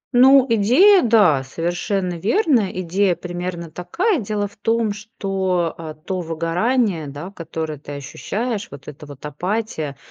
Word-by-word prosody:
Ну, 265 Hz, +1 st, +7 dB
идея 260 Hz, -, +5 dB
да, 200 Hz, -, +4 dB
совершенно 175 Hz, +5 st, -2 dB
верно, 235 Hz, -, +2 dB
идея 185 Hz, +1 st, +1 dB
примерно 175 Hz, -1 st, -5 dB
такая. 345 Hz, -, 0 dB
Дело 205 Hz, -2 st, -2 dB
в 200 Hz, -, -20 dB
том, 225 Hz, 0 st, 0 dB
что, 190 Hz, -5 st, -2 dB
э, 155 Hz, -2 st, -8 dB
то 190 Hz, -1 st, -2 dB
выгорание, 170 Hz, -, 0 dB
да, 145 Hz, +7 st, -7 dB
которое 160 Hz, -4 st, -5 dB
ты 145 Hz, -1 st, -9 dB
ощущаешь, 205 Hz, -, -4 dB
вот 140 Hz, -1 st, -12 dB
эта 150 Hz, 0 st, -10 dB
вот 145 Hz, 0 st, -11 dB
апатия, 160 Hz, -1 st, -3 dB
185 Hz, 135 wpm, -21 LUFS, 160-220 Hz, -, Ну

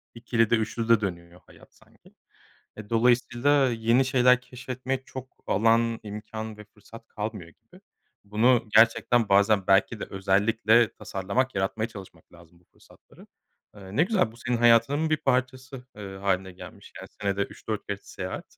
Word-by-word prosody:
ikilide, 115 Hz, -1 st, +1 dB
üçlüde 115 Hz, 0 st, +1 dB
dönüyor 85 Hz, -2 st, -6 dB
hayat -, -, -19 dB
sanki. -, -, -24 dB, 0.6 s
E, 105 Hz, -1 st, -11 dB
dolayısıyla 125 Hz, +4 st, +2 dB
yeni 115 Hz, +3 st, +2 dB
şeyler 125 Hz, -1 st, +3 dB
keşfetmek 130 Hz, +1 st, -6 dB
çok 130 Hz, 0 st, -8 dB, 0.2 s
alan, 115 Hz, +2 st, +2 dB
imkân 110 Hz, +1 st, -7 dB
ve 105 Hz, -, -12 dB
fırsat 105 Hz, +3 st, -16 dB
kalmıyor 105 Hz, -5 st, -6 dB
gibi. -, -, -22 dB, 0.4 s
Bunu 110 Hz, +3 st, +2 dB
gerçekten 115 Hz, 0 st, +4 dB
bazen 100 Hz, 0 st, +3 dB
belki 100 Hz, +3 st, +2 dB
de -, -, -3 dB
özellikle 105 Hz, +3 st, +2 dB
tasarlamak, 100 Hz, +8 st, -3 dB
yaratmaya 100 Hz, +4 st, -2 dB
çalışmak 95 Hz, -7 st, -13 dB
lazım 85 Hz, 0 st, -19 dB
bu -, -, -31 dB
fırsatları. -, -, -21 dB, 0.5 s
Eee, 100 Hz, -1 st, -11 dB
ne 150 Hz, -, +4 dB
güzel, 185 Hz, -, +1 dB
bu 115 Hz, -, -18 dB
senin 120 Hz, 0 st, -2 dB
hayatının 120 Hz, +7 st, +3 dB
bir 155 Hz, -, +3 dB
parçası, 130 Hz, 0 st, -2 dB
eee, 100 Hz, -2 st, -8 dB
hâline 95 Hz, -1 st, -2 dB
gelmiş. 90 Hz, -, -13 dB
Yani, -, -, -11 dB
senede 100 Hz, 0 st, -1 dB
3-4 105 Hz, +1 st, -6 dB
kez 100 Hz, -1 st, -5 dB
seyahat 95 Hz, -2 st, -8 dB
110 Hz, 145 wpm, -26 LUFS, 100-125 Hz, 0.6 s, gerçekten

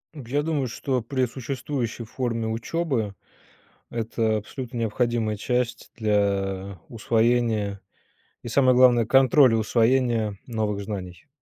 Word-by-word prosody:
Я 140 Hz, +2 st, -2 dB
думаю, 150 Hz, -4 st, -1 dB
что 125 Hz, +2 st, -2 dB
при 130 Hz, +3 st, 0 dB
существующей 125 Hz, -1 st, -4 dB
форме 115 Hz, -1 st, -3 dB
учебы, 115 Hz, -2 st, -2 dB, 0.7 s
это 115 Hz, -1 st, -1 dB
абсолютно 120 Hz, +3 st, -7 dB
необходимая 115 Hz, -1 st, 0 dB
часть 125 Hz, +2 st, -2 dB
для 100 Hz, -3 st, 0 dB
усвоения 115 Hz, -3 st, 0 dB, 0.6 s
и, -, -, -7 dB
самое 130 Hz, +1 st, +4 dB
главное, 120 Hz, -3 st, +5 dB
контроля 135 Hz, -1 st, +5 dB
усвоения 115 Hz, -1 st, +1 dB
новых 105 Hz, -3 st, -2 dB
знаний. 100 Hz, -, -7 dB
115 Hz, 105 wpm, -25 LUFS, 110-130 Hz, 0.7 s, главное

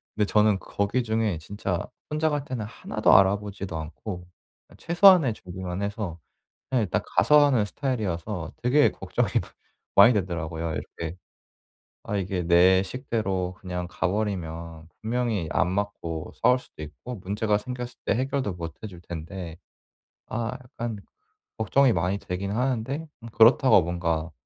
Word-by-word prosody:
근데 105 Hz, -1 st, +2 dB
저는 105 Hz, -1 st, +3 dB
거기 100 Hz, +5 st, -1 dB
중에 110 Hz, -5 st, 0 dB
진짜 90 Hz, 0 st, -3 dB, 0.2 s
혼자 155 Hz, +1 st, +1 dB
갈 145 Hz, -2 st, -1 dB
때는 120 Hz, -6 st, -4 dB
1 110 Hz, -, -7 dB
도 -, -, +7 dB
알아보지도 100 Hz, -2 st, +2 dB
않고 90 Hz, +3 st, -7 dB, 0.5 s
최소한의 175 Hz, -, +6 dB
준비만 90 Hz, -1 st, -6 dB
해서 100 Hz, -4 st, -3 dB, 0.5 s
그냥 125 Hz, -4 st, +2 dB
일단 90 Hz, -, -1 dB
가서 150 Hz, -1 st, +5 dB
하는 125 Hz, -7 st, +3 dB
스타일이어서 105 Hz, -, -3 dB
되게 145 Hz, +4 st, +4 dB
걱정이 -, -, -2 dB
많 -, -, -14 dB, 0.5 s
많이 110 Hz, +4 st, +8 dB
되더라고요. 85 Hz, -4 st, -2 dB
이렇게 85 Hz, +1 st, -6 dB, 0.9 s
아 105 Hz, -, -2 dB
이게 95 Hz, -1 st, -2 dB
내 90 Hz, +2 st, +6 dB
식대로 95 Hz, -7 st, -2 dB
그냥 90 Hz, -1 st, -4 dB
가 -, -, -1 dB
버리면 85 Hz, -5 st, -4 dB
분명히 110 Hz, -6 st, -1 dB
안 -, -, +2 dB
맞고 95 Hz, -5 st, -3 dB
싸울 125 Hz, +2 st, +5 dB
수도 80 Hz, -, -14 dB
있고 120 Hz, +11 st, -8 dB
문제가 105 Hz, +2 st, 0 dB
생겼을 125 Hz, +1 st, -6 dB
때 -, -, +2 dB
해결도 130 Hz, -5 st, -1 dB
못 85 Hz, -2 st, -6 dB
해 -, -, -3 dB
줄 90 Hz, -3 st, -11 dB
텐데 85 Hz, 0 st, -7 dB, 0.7 s
아 115 Hz, +1 st, -3 dB
약간 120 Hz, -2 st, -5 dB, 0.6 s
걱정이 140 Hz, -3 st, +3 dB
많이 90 Hz, +3 st, 0 dB
되기는 100 Hz, +2 st, -4 dB
하는데 130 Hz, +5 st, -1 dB, 0.2 s
음 115 Hz, -, -8 dB
그렇다고 115 Hz, -2 st, +6 dB
뭔가 85 Hz, -1 st, -2 dB
100 Hz, 300 characters per minute, -26 LUFS, 90-120 Hz, 0.9 s, 많이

